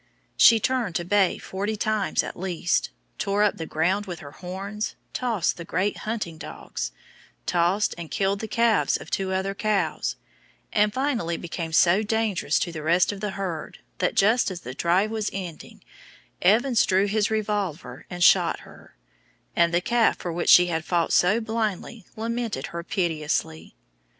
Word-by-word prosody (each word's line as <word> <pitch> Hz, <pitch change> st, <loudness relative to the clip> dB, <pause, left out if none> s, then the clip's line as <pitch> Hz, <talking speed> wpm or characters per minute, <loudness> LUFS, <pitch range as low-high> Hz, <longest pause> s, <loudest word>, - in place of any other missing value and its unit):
She 230 Hz, -1 st, +7 dB
turned 240 Hz, -6 st, -1 dB
to 175 Hz, -, -1 dB
bay 195 Hz, 0 st, +2 dB
forty 205 Hz, +3 st, -3 dB
times 215 Hz, -1 st, 0 dB
at -, -, -6 dB
least; 180 Hz, -1 st, -1 dB, 0.3 s
tore 200 Hz, 0 st, +1 dB
up 210 Hz, -, +2 dB
the 160 Hz, -, -5 dB
ground 185 Hz, +6 st, 0 dB
with 175 Hz, -2 st, -5 dB
her 145 Hz, -, -10 dB
horns, 195 Hz, +6 st, -5 dB, 0.2 s
tossed 225 Hz, -9 st, 0 dB
and 170 Hz, -, -8 dB
killed 200 Hz, -2 st, -2 dB, 2.0 s
the 220 Hz, -, -4 dB
calves 230 Hz, 0 st, +2 dB
of -, -, -12 dB
two 190 Hz, -1 st, -1 dB
other 190 Hz, +1 st, -1 dB
cows, 185 Hz, -, -1 dB, 0.6 s
and 210 Hz, 0 st, +3 dB
finally 235 Hz, -, -1 dB
became 165 Hz, -1 st, -5 dB
so 175 Hz, +5 st, +4 dB
dangerous 215 Hz, -7 st, 0 dB
to 175 Hz, -, -1 dB
the 160 Hz, -2 st, -6 dB
rest 170 Hz, +5 st, +3 dB
of 200 Hz, -1 st, -8 dB
the 210 Hz, -, -1 dB
herd 190 Hz, -5 st, -5 dB, 0.2 s
that, 180 Hz, -, 0 dB
just 220 Hz, +4 st, +3 dB
as 180 Hz, -2 st, -6 dB
the 125 Hz, -, -7 dB
drive 180 Hz, +9 st, +1 dB
was 220 Hz, -2 st, -1 dB
ending, 180 Hz, -5 st, -8 dB, 0.6 s
Evans 230 Hz, +6 st, +4 dB
drew 190 Hz, +1 st, +3 dB
his 210 Hz, +1 st, +1 dB
revolver 205 Hz, -6 st, -3 dB
and 180 Hz, -1 st, -2 dB
shot -, -, +5 dB
her, -, -, -16 dB, 0.6 s
and 170 Hz, 0 st, +3 dB
the 175 Hz, +1 st, +2 dB
calf 235 Hz, +4 st, +2 dB
for 175 Hz, -, -5 dB
which 175 Hz, -, -1 dB
she 180 Hz, -, +9 dB
had 165 Hz, -2 st, -2 dB
fought 170 Hz, 0 st, 0 dB
so 200 Hz, +6 st, +4 dB
blindly 220 Hz, -2 st, -3 dB
lamented 230 Hz, 0 st, -3 dB
her 170 Hz, 0 st, -4 dB
piteously. 160 Hz, -, -2 dB
195 Hz, 155 wpm, -25 LUFS, 170-215 Hz, 2.0 s, she